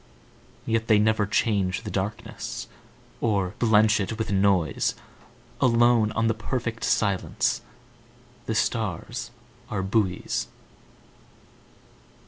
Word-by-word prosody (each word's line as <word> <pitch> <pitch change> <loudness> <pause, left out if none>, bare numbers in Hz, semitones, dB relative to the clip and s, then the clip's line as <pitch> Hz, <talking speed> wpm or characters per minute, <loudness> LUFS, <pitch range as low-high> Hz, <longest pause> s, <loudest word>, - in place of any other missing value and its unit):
Yet 115 0 0
they 110 - +5
never 105 -1 +2
change 100 -3 0
the - - -5
darknessOr 100 0 -4
blench 110 -2 +4
it 105 +2 -2
with 110 -2 -2
noise; 95 -6 +2 0.7
Alone 120 -3 +4
on 110 - +1
the 115 - +3
perfect 115 0 -3
silenceThe 100 -4 +1 0.9
stars 115 +2 -2 0.4
are 100 -4 -2
buoys. 95 -2 0
110 Hz, 90 wpm, -25 LUFS, 100-115 Hz, 0.9 s, they